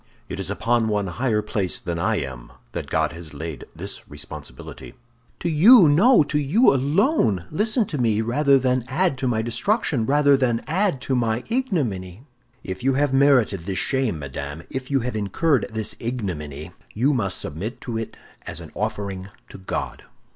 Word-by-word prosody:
It -, -, -5 dB
is -, -, -3 dB
upon 115 Hz, -1 st, +1 dB
one 105 Hz, -2 st, 0 dB
higher 105 Hz, +4 st, -1 dB
placed 100 Hz, -3 st, -2 dB
than 85 Hz, -1 st, -2 dB
I 110 Hz, +6 st, +1 dB
am 65 Hz, -, -5 dB, 0.2 s
that -, -, -5 dB
God -, -, +1 dB
has 85 Hz, -3 st, -10 dB
laid 80 Hz, -2 st, -6 dB
this -, -, -8 dB
responsibility." 75 Hz, 0 st, -9 dB, 0.5 s
"To -, -, -1 dB
you—no, 180 Hz, -, +7 dB
to 150 Hz, +1 st, -1 dB
you 165 Hz, -, +4 dB
alone! 140 Hz, -, +2 dB
Listen 215 Hz, -, +1 dB
to 150 Hz, -6 st, -4 dB
me, 110 Hz, -3 st, +2 dB
rather 140 Hz, +5 st, +3 dB
than 130 Hz, -1 st, +1 dB
add 165 Hz, +4 st, +1 dB
to 130 Hz, -, -1 dB
my 110 Hz, -2 st, 0 dB
destruction, 125 Hz, -, 0 dB
rather 145 Hz, 0 st, +4 dB
than 120 Hz, -4 st, 0 dB
add 175 Hz, -4 st, 0 dB
to 135 Hz, -, -2 dB
my 115 Hz, -1 st, 0 dB
ignominy!" 125 Hz, -, -2 dB, 0.4 s
"If 95 Hz, +2 st, -6 dB
you 135 Hz, 0 st, +2 dB
have 140 Hz, 0 st, +1 dB
merited 135 Hz, -8 st, +4 dB
this 95 Hz, +3 st, -4 dB
shame, 130 Hz, -2 st, 0 dB
madame, 70 Hz, +2 st, -6 dB
if 130 Hz, 0 st, -5 dB
you 135 Hz, -2 st, +2 dB
have 125 Hz, 0 st, -3 dB
incurred 120 Hz, -, +1 dB
this 110 Hz, -1 st, -3 dB
ignominy, 85 Hz, -, -5 dB, 0.2 s
you 130 Hz, +7 st, +2 dB
must 100 Hz, -8 st, 0 dB
submit 100 Hz, -, -5 dB
to 120 Hz, -, -5 dB
it 115 Hz, -, -7 dB, 0.3 s
as 80 Hz, -, -5 dB
an 80 Hz, -3 st, -10 dB
offering 100 Hz, -3 st, -4 dB, 0.2 s
to -, -, -11 dB
God." 95 Hz, -, -4 dB
120 Hz, 170 wpm, -23 LUFS, 95-140 Hz, 0.5 s, you—no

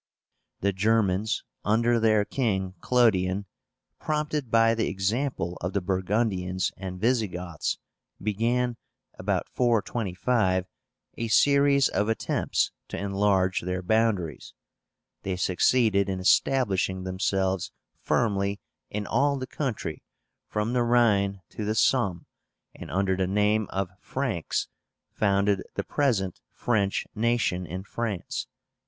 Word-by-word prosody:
The 100 Hz, +1 st, +1 dB
GERMANS, 105 Hz, 0 st, +1 dB, 0.2 s
under 115 Hz, +3 st, +3 dB
their 110 Hz, -2 st, +3 dB
king, 95 Hz, -8 st, -1 dB
CLODION, 100 Hz, -6 st, +2 dB, 0.5 s
prompted 150 Hz, -3 st, -2 dB
by 115 Hz, 0 st, +4 dB
the 115 Hz, 0 st, 0 dB
example 95 Hz, -2 st, -1 dB
of 90 Hz, +2 st, -3 dB
the 100 Hz, -, +2 dB
Burgundians 95 Hz, -1 st, 0 dB
and 95 Hz, -1 st, -6 dB
Visigoths, 90 Hz, -8 st, -1 dB, 0.4 s
began, 115 Hz, +4 st, 0 dB, 0.4 s
about -, -, -1 dB
425, 110 Hz, -4 st, +1 dB, 0.5 s
a 115 Hz, -, -1 dB
series 140 Hz, +4 st, +4 dB
of 105 Hz, +3 st, 0 dB
attempts 115 Hz, -, 0 dB, 0.2 s
to -, -, -6 dB
enlarge 100 Hz, -2 st, +1 dB
their 90 Hz, +1 st, -3 dB
boundaries. 100 Hz, -6 st, 0 dB, 0.7 s
They 95 Hz, -1 st, -2 dB
succeeded 100 Hz, +3 st, +2 dB
in 95 Hz, -1 st, -2 dB
establishing 95 Hz, -3 st, +2 dB
themselves 95 Hz, 0 st, -1 dB, 0.3 s
firmly 100 Hz, -3 st, 0 dB, 0.3 s
in 105 Hz, 0 st, -3 dB
all 140 Hz, +4 st, +2 dB
the 130 Hz, -, -4 dB
country 120 Hz, -, -4 dB, 0.5 s
from 105 Hz, +3 st, -1 dB
the 125 Hz, -, +2 dB
Rhine 105 Hz, -5 st, +3 dB
to 110 Hz, -, -6 dB
the 105 Hz, +1 st, -1 dB
Somme, 100 Hz, -7 st, +2 dB, 0.5 s
and -, -, -10 dB
under 95 Hz, 0 st, +1 dB
the 95 Hz, 0 st, 0 dB
name 105 Hz, +2 st, +2 dB
of 95 Hz, -2 st, -2 dB
FRANKS 120 Hz, -, -2 dB, 0.4 s
founded 100 Hz, -1 st, +2 dB
the -, -, -1 dB
present 110 Hz, -11 st, 0 dB
French 100 Hz, -5 st, 0 dB
nation 110 Hz, -6 st, 0 dB
in 90 Hz, +4 st, -5 dB
France 105 Hz, -3 st, -4 dB
(447). -, -, -58 dB
105 Hz, 115 wpm, -27 LUFS, 95-115 Hz, 0.7 s, by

